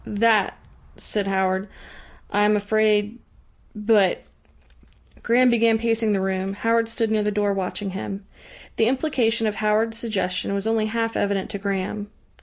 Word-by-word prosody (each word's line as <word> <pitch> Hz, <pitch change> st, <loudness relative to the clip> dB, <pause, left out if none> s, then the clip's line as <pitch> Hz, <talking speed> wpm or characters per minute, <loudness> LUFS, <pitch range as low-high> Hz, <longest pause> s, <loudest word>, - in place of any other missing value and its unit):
"That," 215 Hz, 0 st, +2 dB, 0.4 s
said 205 Hz, -2 st, -3 dB
Howard, 190 Hz, 0 st, 0 dB, 0.6 s
"I 205 Hz, -, +2 dB
am 210 Hz, 0 st, +4 dB
afraid 210 Hz, +1 st, +1 dB, 0.6 s
But 210 Hz, -3 st, +2 dB, 0.5 s
" -, -, -29 dB
Graham 245 Hz, +1 st, +4 dB
began 230 Hz, -1 st, +3 dB
pacing 225 Hz, -1 st, 0 dB
the 200 Hz, -, +1 dB
room. 190 Hz, 0 st, -2 dB
Howard 230 Hz, +2 st, +1 dB
stood 225 Hz, -1 st, -1 dB
near 215 Hz, -1 st, +2 dB
the 210 Hz, -, 0 dB
door 205 Hz, -1 st, 0 dB
watching 195 Hz, +1 st, -3 dB
him. 195 Hz, +1 st, -6 dB, 0.5 s
The 225 Hz, -, +3 dB
implication 245 Hz, -4 st, +1 dB
of 215 Hz, -1 st, -1 dB
Howard's 220 Hz, +1 st, +1 dB
suggestion 200 Hz, -4 st, -2 dB
was 200 Hz, +1 st, -2 dB
only 220 Hz, -1 st, +1 dB
half 225 Hz, +1 st, -2 dB
evident 200 Hz, -1 st, -1 dB
to 200 Hz, -, -5 dB
Graham. 200 Hz, +1 st, -3 dB
210 Hz, 150 wpm, -23 LUFS, 200-225 Hz, 0.6 s, am